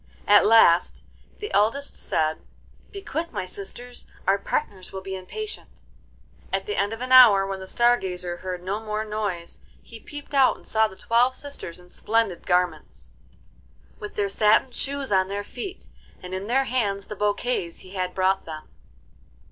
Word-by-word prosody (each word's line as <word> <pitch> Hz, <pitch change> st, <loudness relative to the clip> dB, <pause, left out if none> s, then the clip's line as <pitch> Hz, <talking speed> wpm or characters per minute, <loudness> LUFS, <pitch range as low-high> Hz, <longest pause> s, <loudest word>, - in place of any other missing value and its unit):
At 205 Hz, 0 st, +6 dB
last 195 Hz, -6 st, +5 dB, 0.3 s
the 420 Hz, -, -6 dB
eldest 230 Hz, +8 st, +1 dB
said, 155 Hz, 0 st, 0 dB, 0.5 s
'Be 395 Hz, -2 st, -8 dB
quick, 335 Hz, -1 st, -3 dB
my 185 Hz, -, -3 dB
sisters, 235 Hz, +6 st, -8 dB, 0.2 s
our 195 Hz, +1 st, +3 dB
partners 190 Hz, -1 st, -3 dB
will 190 Hz, -, -6 dB
be 190 Hz, 0 st, -5 dB
impatient.' 425 Hz, -, -8 dB, 0.7 s
At -, -, -1 dB
the 420 Hz, -, -3 dB
end 205 Hz, -, 0 dB
of 225 Hz, +1 st, -6 dB
an 255 Hz, 0 st, -4 dB
hour, 225 Hz, -7 st, +8 dB
when 195 Hz, 0 st, -4 dB
the 190 Hz, -, -8 dB
Star 240 Hz, +4 st, +3 dB
Gazer 180 Hz, -3 st, -4 dB
heard 180 Hz, -1 st, -6 dB
no 195 Hz, +3 st, -2 dB
more 215 Hz, 0 st, -3 dB
noise, 205 Hz, -5 st, -4 dB, 0.2 s
he 230 Hz, -, -12 dB
peeped 290 Hz, +4 st, -10 dB
out 270 Hz, -2 st, +4 dB
and -, -, -20 dB
saw 220 Hz, 0 st, +3 dB
the 190 Hz, -, -13 dB
twelve 240 Hz, +6 st, +2 dB
sisters 285 Hz, -12 st, -6 dB
in 180 Hz, 0 st, -18 dB
splendid 220 Hz, -6 st, 0 dB
garments, 180 Hz, -4 st, -1 dB, 0.9 s
with 210 Hz, -, -8 dB
their 205 Hz, -1 st, 0 dB
satin 215 Hz, +5 st, +3 dB
shoes 275 Hz, +1 st, -2 dB
on 190 Hz, -1 st, +3 dB
their 200 Hz, +1 st, -4 dB
feet, 355 Hz, -, -8 dB, 0.4 s
and 180 Hz, 0 st, -7 dB
in 190 Hz, +2 st, -4 dB
their 265 Hz, +4 st, +2 dB
hands 205 Hz, -7 st, -1 dB
the 210 Hz, -, -7 dB
bouquets 205 Hz, -3 st, -1 dB
he 185 Hz, -, -13 dB
had 185 Hz, -1 st, -3 dB
brought 190 Hz, +1 st, +1 dB
them. 155 Hz, -1 st, -8 dB
205 Hz, 170 wpm, -25 LUFS, 185-245 Hz, 0.9 s, hour